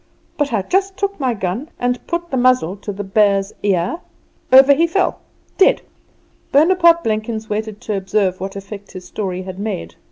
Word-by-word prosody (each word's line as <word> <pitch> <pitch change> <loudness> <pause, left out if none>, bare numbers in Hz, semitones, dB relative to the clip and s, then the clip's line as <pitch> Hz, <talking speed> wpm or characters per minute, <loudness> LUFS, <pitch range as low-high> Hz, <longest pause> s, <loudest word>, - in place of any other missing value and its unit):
But 290 -2 -1
I 210 -4 0
just 385 - 0
took 400 -2 -2
my 255 -4 0
gun 200 - -3
and 245 0 -2
put 345 0 -3
the - - -1
muzzle 250 -8 +2
to 205 +1 -6
the 205 +1 -5
bear's 195 0 +2
ear 190 - 0 0.5
over 270 +2 +8
he 330 +4 +2
fell 360 +2 0 0.4
dead!" 385 - +4 0.7
Bonaparte 335 +3 +5
Blenkins 220 0 -3
waited 215 0 -3
to 215 - -3
observe 190 -1 0
what 195 +1 -5
effect 200 0 -9
his 185 -1 -9
story 185 -1 -4
had 185 0 -8
made. 200 - -4
215 Hz, 170 wpm, -18 LUFS, 195-285 Hz, 0.7 s, over